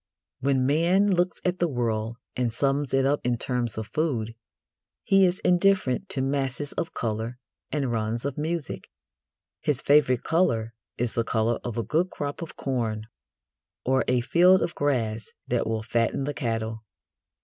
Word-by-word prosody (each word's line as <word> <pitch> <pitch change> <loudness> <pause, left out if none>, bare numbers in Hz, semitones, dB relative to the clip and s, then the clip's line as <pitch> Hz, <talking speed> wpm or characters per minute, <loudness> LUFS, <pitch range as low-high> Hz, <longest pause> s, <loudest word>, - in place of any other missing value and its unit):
When 130 -1 +2
man 175 +8 +3
looks 175 -1 +1
at 180 0 0
the 175 - +3
world 115 -4 -1 0.2
and 125 -2 0
sums 140 +3 0
it 135 0 +3
up 145 +2 +2
in 120 -1 +1
terms 120 -3 -2
of 110 - -3
food, 120 -6 -1 0.7
he 195 -1 +5
is 180 0 +1
indifferent 185 -3 +2
to 135 -8 -1
masses 135 +1 -1
of 170 - -4
colour 115 +1 -2 0.3
and 140 -5 0
runs 115 +2 -2
of 140 -2 -2
music. 160 -1 -3 0.7
His 145 -4 0
favourite 140 -4 +4
colour 115 -10 +1 0.2
is 120 -1 -1
the 115 - +1
colour 115 +1 0
of 120 -2 -4
a 115 - 0
good 170 +8 +1
crop 145 -2 -5
of 165 - -7
corn 115 -5 -2 0.8
or 130 +1 +3
a 125 -1 +2
field 180 +8 +5
of 170 - -2
grass 115 -6 -1
that 120 -2 0
will 110 -1 -1
fatten 115 +3 0
the 145 +2 -2
cattle. 115 -4 -3
130 Hz, 160 wpm, -26 LUFS, 115-155 Hz, 0.8 s, he